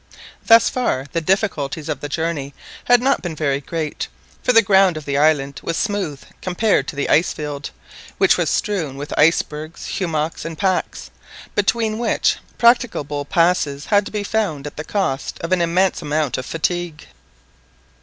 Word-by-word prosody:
Thus 230 0 +7
far 135 - -1
the 165 - -1
difficulties 160 -5 -1
of 150 -4 -3
the 145 - -6
journey 150 -3 -3 0.3
had 245 0 +5
not 275 +1 +2
been 175 -3 -4
very 140 -2 0
great, 155 +1 -4 0.3
for - - +2
the 230 -1 +6
ground 190 -3 +4
of 155 - -7
the 140 - -2
island 140 -2 +2
was 165 - -3
smooth 200 -10 -2 0.2
compared 185 -5 +1
to - - -5
the 140 - -1
ice 165 - +3
field, 145 -1 -5 0.5
which - - +4
was - - 0
strewn 170 - -1
with 145 +1 -6
icebergs, 155 0 0
hummocks, 160 -3 -2
and 165 -1 -6
packs, 190 -1 -1 0.4
between 220 +2 0
which, 235 - +1 0.2
practicable 205 - +2
passes 150 -3 +1
had 205 -1 +2
to - - -8
be 210 -1 -2
found 195 -10 -1
at 145 - -7
the 155 - -5
cost 155 -7 -2
of 165 - -4
an 185 -1 +3
immense 180 +3 +1
amount 150 -3 -1
of 130 - -7
fatigue. 170 -1 -2
165 Hz, 165 wpm, -20 LUFS, 145-195 Hz, 0.5 s, Thus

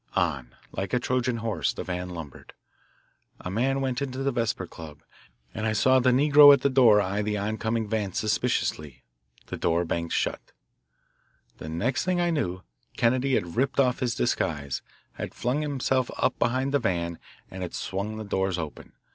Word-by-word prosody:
On, 70 -8 -1 0.2
like 95 - -3
the 125 - +1
Trojan 125 -1 0
horse, 115 -1 -1
the - - -5
van 90 0 -4
lumbered. 80 -6 -9 0.9
A 90 - -6
man 135 +6 0
went 130 -2 -1
into 135 -1 -3
the 140 - +1
Vesper 115 -6 -1
Club, 80 -4 -11 0.5
and 110 0 -2
I 110 - +1
saw 130 +5 +4
the 130 0 +3
negro 145 +3 +8
at 140 -2 +5
the 140 - +2
door 120 -5 +6
eye 100 +1 -1
the 105 0 -1
oncoming 110 +2 -2
van 105 -2 -1
suspiciously. 100 - -1 0.4
The - - -6
door 85 +1 +1
banged 85 0 -3
shut. - - -2 1.1
The 80 - -7
next 110 - -1
thing 180 0 0
I 175 0 +2
knew, 95 - -2 0.3
Kennedy 130 +3 +2
had 85 -1 -2
ripped 135 +3 0
off 125 -3 +3
his 125 -2 -1
disguise, 70 +2 -1 0.3
had - - -7
flung 125 +5 -1
himself 130 -3 0
up - - 0
behind 130 +3 0
the 145 - +4
van, 85 -7 -2 0.3
and 95 - -7
had 90 - -5
swung 100 +3 -4
the 110 - -5
doors 95 -2 -1
open. 80 -3 -7
110 Hz, 175 wpm, -26 LUFS, 90-130 Hz, 1.1 s, negro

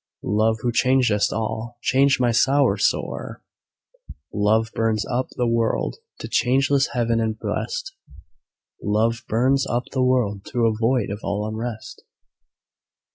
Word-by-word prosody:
"Love, 110 +3 +1
who 120 - +1
changest 125 -4 +2
all, 110 +2 -4
change 135 +1 +3
my 120 -1 +2
sorrow 135 +4 +3
sore!" - - -2 0.9
Love 110 +2 +2
burns 110 -2 0
up 125 +1 -1
the 125 - +1
world 115 -1 0 0.2
to - - -7
changeless 135 +2 +2
heaven 115 -2 +1
and 110 -1 -1
blest, 425 - -4 0.9
"Love 110 +3 0
burns 130 +4 +2
up 120 +1 -1
the 130 - -1
world 120 -6 +1
to 120 0 -1
a 115 - +3
void 115 -1 0
of 100 - -4
all 105 +1 -2
unrest." 110 +1 -6
115 Hz, 130 wpm, -22 LUFS, 110-130 Hz, 0.9 s, change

